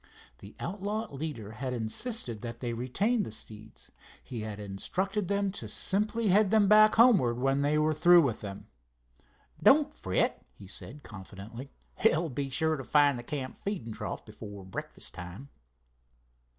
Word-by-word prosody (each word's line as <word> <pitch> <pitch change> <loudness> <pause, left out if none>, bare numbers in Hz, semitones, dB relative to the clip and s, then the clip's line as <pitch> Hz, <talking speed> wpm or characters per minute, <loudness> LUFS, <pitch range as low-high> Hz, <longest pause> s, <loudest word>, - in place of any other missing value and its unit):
The 100 +2 -12
outlaw 205 +1 -3
leader 135 -8 -5
had 125 +4 -4
insisted 120 - -2
that 120 -1 -6
they 120 -2 -3
retain 195 - 0
the 185 - -4
steeds. 110 0 -6 0.3
He 120 -3 -6
had 105 -1 -5
instructed 185 - -2
them 200 0 0
to 200 - -6
simply 210 +2 +1
head 200 +2 +5
them 215 -1 +4
back 215 +1 +7
homewards 200 - +5
when 135 +2 +1
they 145 +2 +2
were 155 +1 +2
through 175 +2 +6
with 125 -6 -1
them. 100 -1 -7 1.0
"Don't 295 +1 +5
fret," 95 0 -1
he 95 - -13
had 95 - -5
said, 145 +6 -7
confidently, 105 +5 -9 0.3
"they'll 170 -6 +3
be 135 +1 -3
sure 160 +4 +1
to 135 - -6
find 145 -2 +4
the - - -7
camp 130 0 -5
feeding 155 - -4
trough 105 0 -6
before 105 -2 -10
breakfast 95 - -7
time." 90 +10 -9
140 Hz, 160 wpm, -30 LUFS, -, 1.0 s, back